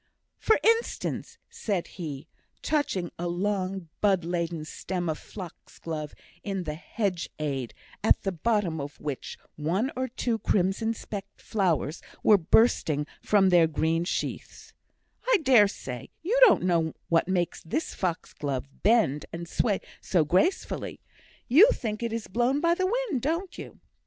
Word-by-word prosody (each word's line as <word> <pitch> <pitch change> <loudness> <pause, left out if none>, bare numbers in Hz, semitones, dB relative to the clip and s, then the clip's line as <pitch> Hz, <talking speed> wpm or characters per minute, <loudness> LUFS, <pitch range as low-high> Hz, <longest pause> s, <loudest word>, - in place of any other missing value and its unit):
"For 440 - +3
instance," 455 +1 0
said 205 - -2
he, 155 -4 -7 0.4
touching 240 - 0
a 175 - -2
long 190 0 -2
bud 195 -5 +3
laden 170 -2 -2
stem 175 +2 -4
of 155 -1 -2
fox 185 -5 -10
glove 155 -2 -5 0.3
in 195 -3 -2
the 155 -3 -3
hedge 180 +2 -3
side, 135 -6 -3 0.3
at - - +4
the 195 - 0
bottom 185 -4 0
of 145 +1 -8
which 145 -3 -5 0.2
one 180 - 0
or 260 +1 -1
two 235 -2 -2
crimson 205 +5 +1
speckled 200 -2 -8
flowers 175 -7 0 0.2
were 210 -2 +6
bursting 160 -5 +3 0.2
from 195 -3 +4
their 175 -2 +6
green 160 +2 0
sheaths, 175 - -4 0.6
"I - - +6
dare 245 -7 +7
say, 125 - -7
you 405 +9 0
don't 405 - +4
know 170 -3 +1
what 165 0 +3
makes 180 -2 -1
this 305 - -3
fox 180 -3 -3
glove 135 -3 -3
bend 205 - +3
and 170 +1 -6
sway 205 +3 0 0.2
so 170 -5 +2
gracefully. 250 - 0 0.5
You 330 - +8
think 215 -3 -4
it 235 -1 -2
is 225 -1 -3
blown 245 +7 +1
by 335 +2 +3
the 370 +2 0
wind, 455 - -1
don't 335 +7 -2
you?" - - -9
190 Hz, 150 wpm, -27 LUFS, 165-230 Hz, 0.6 s, You